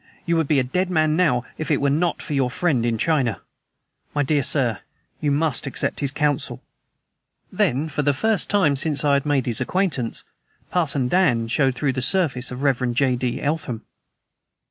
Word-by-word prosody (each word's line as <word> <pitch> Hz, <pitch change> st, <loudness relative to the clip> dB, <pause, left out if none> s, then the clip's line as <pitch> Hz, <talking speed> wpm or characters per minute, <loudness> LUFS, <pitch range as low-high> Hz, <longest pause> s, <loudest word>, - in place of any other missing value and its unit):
You 170 Hz, -, +1 dB
would 160 Hz, -3 st, +1 dB
be 150 Hz, -, +2 dB
a 135 Hz, -, +3 dB
dead 180 Hz, +9 st, -1 dB
man 155 Hz, -3 st, +2 dB
now 145 Hz, -9 st, +2 dB
if 155 Hz, -, -3 dB
it 150 Hz, -, +2 dB
were 140 Hz, 0 st, +1 dB
not 165 Hz, +4 st, 0 dB
for 150 Hz, -, -5 dB
your 135 Hz, -3 st, +1 dB
friend 130 Hz, -4 st, 0 dB
in 115 Hz, -1 st, 0 dB
China! 130 Hz, -, +1 dB, 0.8 s
My 145 Hz, -, +2 dB
dear 145 Hz, +1 st, +1 dB
sir, 125 Hz, -6 st, +1 dB, 0.4 s
you 150 Hz, -, 0 dB
must 145 Hz, -1 st, 0 dB
accept -, -, -2 dB
his 140 Hz, -, +1 dB
counsel." 145 Hz, -1 st, -1 dB, 0.9 s
Then, 140 Hz, +6 st, 0 dB
for 150 Hz, -1 st, -2 dB
the 145 Hz, 0 st, +2 dB
first 220 Hz, +9 st, +1 dB
time 185 Hz, -9 st, +3 dB
since 145 Hz, +1 st, +1 dB
I 145 Hz, -, +3 dB
had 140 Hz, +1 st, +1 dB
made 140 Hz, -3 st, +1 dB
his 115 Hz, -3 st, +1 dB
acquaintance, 170 Hz, -11 st, -1 dB, 0.5 s
"Parson 145 Hz, -7 st, +1 dB
Dan" 125 Hz, -9 st, +2 dB
showed 130 Hz, +1 st, +1 dB
through 135 Hz, 0 st, 0 dB
the 130 Hz, -, -3 dB
surface 130 Hz, -5 st, +1 dB
of 125 Hz, +1 st, -6 dB
the -, -, -2 dB
Rev. 125 Hz, -3 st, +1 dB
J. 130 Hz, 0 st, +2 dB
D. 125 Hz, -1 st, -3 dB
Eltham. 140 Hz, -6 st, -2 dB
140 Hz, 190 wpm, -22 LUFS, 125-155 Hz, 0.9 s, a